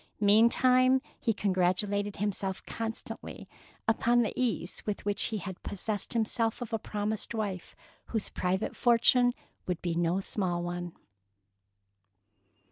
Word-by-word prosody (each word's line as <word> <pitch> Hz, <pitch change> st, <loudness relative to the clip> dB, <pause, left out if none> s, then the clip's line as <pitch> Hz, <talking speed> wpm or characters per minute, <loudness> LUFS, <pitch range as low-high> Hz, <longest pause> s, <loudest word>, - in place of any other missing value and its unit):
Meantime, 250 Hz, +5 st, +5 dB, 0.2 s
he 230 Hz, -, +1 dB
congratulated 200 Hz, +1 st, 0 dB
himself 195 Hz, -2 st, -2 dB
constantly 225 Hz, 0 st, -6 dB, 0.4 s
upon 235 Hz, +2 st, +3 dB
the 220 Hz, -, -2 dB
ease 215 Hz, -8 st, -1 dB
with 210 Hz, -2 st, -4 dB
which 205 Hz, -1 st, +1 dB
he 220 Hz, -, -2 dB
had 190 Hz, -2 st, -7 dB
possessed 205 Hz, +3 st, -2 dB
himself 225 Hz, 0 st, 0 dB
of 240 Hz, -1 st, -6 dB
a 225 Hz, -, +1 dB
promised 210 Hz, +2 st, -3 dB
wife 200 Hz, -5 st, -4 dB, 0.3 s
whose 220 Hz, -3 st, -2 dB
private 185 Hz, +3 st, -1 dB
fortune 245 Hz, +1 st, +5 dB, 0.4 s
would 180 Hz, -2 st, -1 dB
be 175 Hz, -2 st, 0 dB
no 170 Hz, +2 st, +1 dB
small 180 Hz, -3 st, -1 dB
one. 175 Hz, -1 st, -4 dB
205 Hz, 125 wpm, -30 LUFS, 185-225 Hz, 0.4 s, Meantime